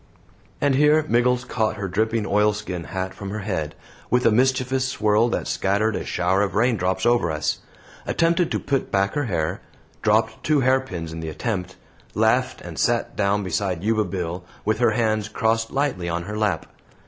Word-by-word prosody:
And 140 -1 +2
here 150 +3 +4
Miggles 125 0 +2
caught 110 -3 -1
her 100 -2 -4
dripping 110 +4 0
oilskin 105 -4 0
hat 95 -1 -4
from 100 - -7
her 105 +2 -4
head, 85 -7 -3 0.3
with 125 +1 +2
a 115 - +6
mischievous 130 +2 +2
swirl 110 -1 +2
that - - -2
scattered 105 +3 +1
a - - -3
shower 90 +3 +1
of 100 -1 -1
raindrops 95 -5 +1
over 120 -7 +3
us; 75 0 -1 0.5
attempted 170 +1 +2
to - - 0
put 140 -2 -1
back 100 0 +1
her 145 -1 -1
hair; 85 -8 -2 0.4
dropped - - +1
two 150 -2 +2
hairpins 125 -11 0
in 80 - -6
the 80 -1 -4
attempt; 95 0 -3 0.4
laughed - - +2
and - - -8
sat - - +1
down 100 0 +1
beside 90 -1 -2
Yuba 110 0 +2
Bill, 90 -1 -4 0.2
with 110 +1 +1
her 120 - +3
hands 110 -3 0
crossed 115 +1 0
lightly 135 -12 -1
on 85 +1 -2
her 105 +4 -6
lap. 105 -6 0
105 Hz, 175 wpm, -23 LUFS, 95-125 Hz, 0.5 s, a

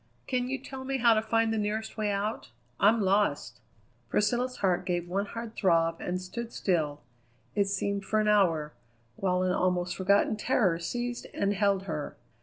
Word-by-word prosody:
"Can 250 -1 -1
you 270 - -1
tell 265 0 -8
me 270 +1 -1
how 235 -2 +5
to 215 - +2
find 225 0 +1
the 220 - 0
nearest 215 +1 -2
way 215 -1 -1
out? 200 - -2 0.3
I'm 220 +3 +4
lost." 200 +1 +1 0.5
Priscilla's 245 +4 +1
heart 185 -3 +1
gave 175 -1 -2
one 195 +3 -1
hard 230 +1 -7
throb 165 -3 +2
and 180 +1 -2
stood 230 +6 -6
still, 155 -6 -1 0.5
it 200 -1 +2
seemed 200 0 -1
for 215 +2 0
an 215 - +1
hour, 165 -8 +3 0.4
while 185 +2 0
an 185 - +1
almost 180 -1 0
forgotten 200 +3 +2
terror 205 -7 +2
seized 240 +8 -4
and 200 0 +1
held 200 -1 +1
her. 150 -6 -5
200 Hz, 175 wpm, -29 LUFS, 180-225 Hz, 0.5 s, how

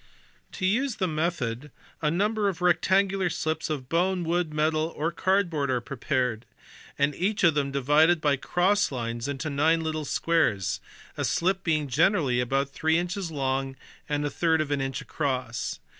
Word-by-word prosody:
To 185 - -3
use 240 +6 +1
the 185 - 0
method 155 -5 -2 0.3
a 150 - +2
number 205 +5 +1
of 185 - -5
rectangular 190 +2 +2
slips 160 0 -2
of 140 -5 -3
bone, 180 +4 +1
wood, 170 -1 0
metal, 155 +1 0
or 160 +3 0
cardboard 175 -7 0
are 125 -1 +1
prepared, 125 -2 -2 0.5
and 140 +1 +2
each 200 +7 -1
of 170 -3 +6
them 145 -1 0
divided 150 +5 +4
by 145 -2 +2
cross 185 +8 +1
lines 120 -1 -3
into 140 +2 -3
nine 160 +4 +2
little 155 -1 -3
squares; 140 - +1 0.4
a - - -1
slip 190 +2 0
being 155 -3 0
generally 135 -2 +2
about 135 +3 0
three 160 +3 +1
inches 180 +1 -2
long 135 -2 -2 0.3
and 145 0 0
a 145 - -2
third 165 -2 +2
of 155 -2 -1
an 140 -1 0
inch 135 -1 -3
across. 125 - -3
155 Hz, 165 wpm, -26 LUFS, 135-175 Hz, 0.5 s, of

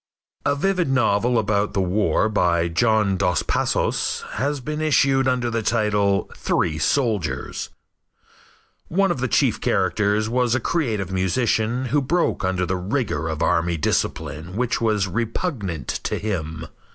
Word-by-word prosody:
A 145 - +2
vivid 180 +1 0
novel 120 -2 +2
about 105 -1 0
the - - +1
war 95 +4 +1
by 85 -5 +1
John 105 +2 +2
Dos 90 -2 +1
Passos - - 0
has 140 +5 -1
been 150 +4 -4
issued 135 -3 +3
under 125 -2 0
the 115 0 -1
title 105 -3 +1
"Three 80 -2 0
Soldiers." 105 - -1 1.2
One 195 +2 +2
of 155 - -2
the 130 - 0
chief - - +1
characters 105 +4 +1
was 125 +1 +1
a - - +1
creative 110 - -1
musician 110 +6 0
who 145 - +4
broke 165 - 0
under 95 -1 0
the 90 +1 -1
rigor 90 - -2
of 80 0 -2
army 85 -1 +1
discipline 80 +3 -2
which 125 +1 -1
was 105 -4 +1
repugnant 105 - -3
to - - -2
him. 80 -6 -4
105 Hz, 140 wpm, -22 LUFS, 90-125 Hz, 1.2 s, who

